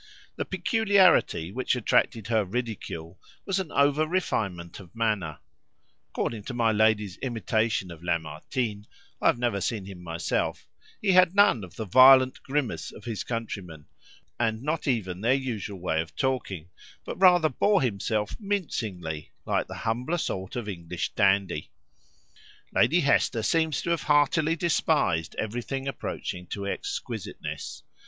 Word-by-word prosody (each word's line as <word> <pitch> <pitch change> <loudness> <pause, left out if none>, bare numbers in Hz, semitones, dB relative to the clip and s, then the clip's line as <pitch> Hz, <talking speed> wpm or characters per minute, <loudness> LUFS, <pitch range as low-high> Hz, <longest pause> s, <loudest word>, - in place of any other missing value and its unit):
The - - -3
peculiarity 200 - +3
which 130 +4 0
attracted 115 -2 +1
her 110 -2 +2
ridicule 95 -6 -5 0.3
was 195 -1 0
an 185 -5 -4
over 145 +2 +3
refinement 100 - -2
of 95 +1 -14
manner: 105 -9 -1 0.7
according 110 -3 -3
to 125 - -5
my 115 -2 +3
lady's 105 -2 +2
imitation 110 -5 -1
of 85 -1 -11
Lamartine 85 - -3 0.3
(I - - +3
have - - +4
never 120 -5 0
seen 105 -2 -2
him 95 -2 -9
myself), 85 -1 -2 0.4
he 200 - +4
had 185 0 +5
none 200 - +5
of 90 - -11
the 110 - -4
violent 130 +4 +7
grimace 130 - -2
of - - -13
his 110 -5 -3
countrymen, 100 -10 -5 0.5
and 115 0 0
not 155 +2 -2
even 95 -8 -1
their 120 +4 +3
usual 110 -7 -4
way 80 -3 0
of 80 - -9
talking, 100 - -2 0.3
but - - -6
rather 180 -4 +6
bore 195 +5 +2
himself 105 -2 -1
mincingly, 110 - -3
like - - 0
the - - -7
humbler 125 +9 0
sort 95 - -3
of 120 -4 -4
English 85 -3 -4
dandy. 95 -6 +1 1.0
Lady 175 +3 +4
Hester 130 -5 +2
seems 160 +6 +1
to 170 - -1
have 170 - +1
heartily 150 +2 +3
despised 150 - +1
everything 120 +5 -3
approaching 90 -8 -5
to 100 -1 -5
exquisiteness. 100 - -5
115 Hz, 140 wpm, -27 LUFS, 95-140 Hz, 1.0 s, violent